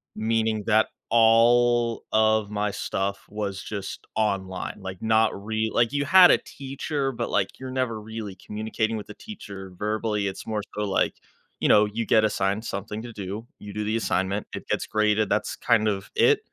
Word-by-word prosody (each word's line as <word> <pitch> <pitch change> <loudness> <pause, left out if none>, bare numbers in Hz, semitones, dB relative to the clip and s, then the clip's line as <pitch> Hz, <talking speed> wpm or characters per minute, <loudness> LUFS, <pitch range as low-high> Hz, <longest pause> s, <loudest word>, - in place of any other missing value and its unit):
meaning 110 -1 0
that 110 -1 +4 0.2
all 115 +1 +4
of 110 -1 +3
my 105 0 -1
stuff 100 +1 -3
was 100 -2 -4
just 100 -2 -6
online. 95 -3 -1
Like, 95 -1 -7
not 110 0 +3
re 110 0 0
like, 120 -1 +3
you 145 0 0
had 185 +4 +8
a - - +6
teacher, 135 0 -4
but, 120 - -3
like, - - -1
you're 130 -1 -6
never 125 -4 -1
really 110 -2 -7
communicating 110 +3 -3
with 105 - -7
the 105 - -9
teacher 100 - -9
verbally, 105 0 -1
it's 95 - -6
more 110 -1 -1
so, 105 - -1
like, 100 -2 +1 0.4
you - - +1
know, 105 0 +6
you 110 +2 -3
get 110 0 +4
assigned 100 0 0
something 105 +2 -4
to 120 0 -8
do, 100 +2 -6
you 105 -1 -9
do 105 - -2
the 110 +2 0
assignment, 100 -1 -1
it - - -8
gets - - 0
graded, 105 0 +2
that's 105 - 0
kind 110 -3 +2
of 100 -2 -2
it. - - +5
110 Hz, 180 wpm, -25 LUFS, 105-115 Hz, 0.4 s, had